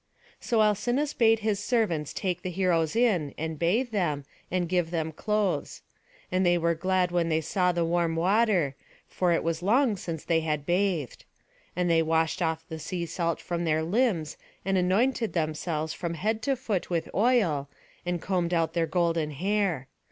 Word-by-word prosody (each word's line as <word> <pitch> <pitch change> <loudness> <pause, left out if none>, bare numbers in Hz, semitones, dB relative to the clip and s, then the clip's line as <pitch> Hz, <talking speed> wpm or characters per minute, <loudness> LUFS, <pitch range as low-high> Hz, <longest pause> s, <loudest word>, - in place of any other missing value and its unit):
So 225 -3 +2
Alcinous 240 +8 +1
bade 225 -1 +3
the 215 -1 +2
servants 205 - 0
take 185 -3 -2
the 185 - -4
heroes 175 -3 +1
in, 195 - +2
and 160 -1 -4
bathe 225 +9 +1
them, 155 -9 -1 0.2
and 180 -1 0
give 175 -1 0
them 160 -2 -2
clothes. 210 +4 -1 0.5
And 185 +1 +2
they 175 -1 +4
were 170 0 +2
glad 185 +1 +1
when 170 -1 +1
they 160 0 +2
saw 180 +3 +1
the 170 -1 0
warm 170 -1 +1
water, 185 -4 +2 0.3
for 180 -2 0
it 165 - +1
was 165 0 -1
long 230 +4 +3
since 165 -4 -5
they 165 -1 +2
had 150 -2 -2
bathed. 175 - 0 0.5
And 180 0 0
they 165 -1 +4
washed 160 +1 +1
off 160 -1 -1
the 160 - -6
sea 170 +3 -3
salt 170 -1 -2
from 175 -1 -3
their 160 -1 +1
limbs, 175 -4 0 0.3
and 195 0 +1
anointed 215 +6 +1
themselves 155 -1 -2
from 170 -1 -4
head 215 +7 -1
to 275 +3 +1
foot 225 -8 -3
with 170 -2 -1
oil, 195 - +2 0.3
and 175 0 -2
combed 180 -1 0
out 165 -1 +1
their 165 -1 +1
golden 165 -1 +1
hair. 180 -2 -1
175 Hz, 175 wpm, -27 LUFS, 160-200 Hz, 0.5 s, they